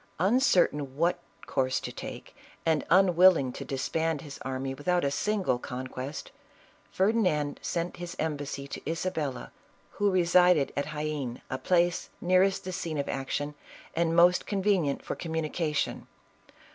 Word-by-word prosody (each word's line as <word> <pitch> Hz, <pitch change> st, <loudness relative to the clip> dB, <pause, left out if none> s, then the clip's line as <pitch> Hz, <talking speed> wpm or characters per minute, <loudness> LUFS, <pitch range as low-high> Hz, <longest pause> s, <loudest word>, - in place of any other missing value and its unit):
Uncertain 180 Hz, -, +2 dB
what 175 Hz, +2 st, +2 dB, 0.3 s
course 130 Hz, 0 st, 0 dB
to -, -, -6 dB
take, -, -, -8 dB, 0.3 s
and 160 Hz, -2 st, +2 dB
unwilling 180 Hz, -7 st, +5 dB
to -, -, -6 dB
dis 135 Hz, -1 st, -3 dB
band 160 Hz, -2 st, 0 dB
his 145 Hz, -3 st, -9 dB
army 135 Hz, 0 st, -3 dB
without 175 Hz, +6 st, 0 dB
a 140 Hz, -, +1 dB
single 195 Hz, -7 st, 0 dB
conquest, 130 Hz, +2 st, -6 dB, 0.6 s
Ferdinand 185 Hz, -8 st, +1 dB
sent 175 Hz, 0 st, -3 dB
an 175 Hz, -, -5 dB
embassy 145 Hz, -3 st, -3 dB
to -, -, -7 dB
Isabella 160 Hz, -5 st, -3 dB, 0.4 s
who 205 Hz, 0 st, +1 dB
resided 180 Hz, -4 st, +4 dB
at 140 Hz, -, -1 dB
Jaen, 150 Hz, -5 st, -4 dB
a 130 Hz, -, -2 dB
place 175 Hz, 0 st, +1 dB
nearest 185 Hz, +2 st, +3 dB
the 185 Hz, -, -5 dB
scene 165 Hz, -3 st, -3 dB
of 140 Hz, -, -2 dB
action 145 Hz, +2 st, -3 dB, 0.4 s
and 165 Hz, 0 st, +1 dB
most 175 Hz, +1 st, +5 dB
convenient 190 Hz, -8 st, +1 dB
for -, -, -2 dB
communication. 160 Hz, -2 st, -2 dB
160 Hz, 135 wpm, -28 LUFS, 140-180 Hz, 0.6 s, unwilling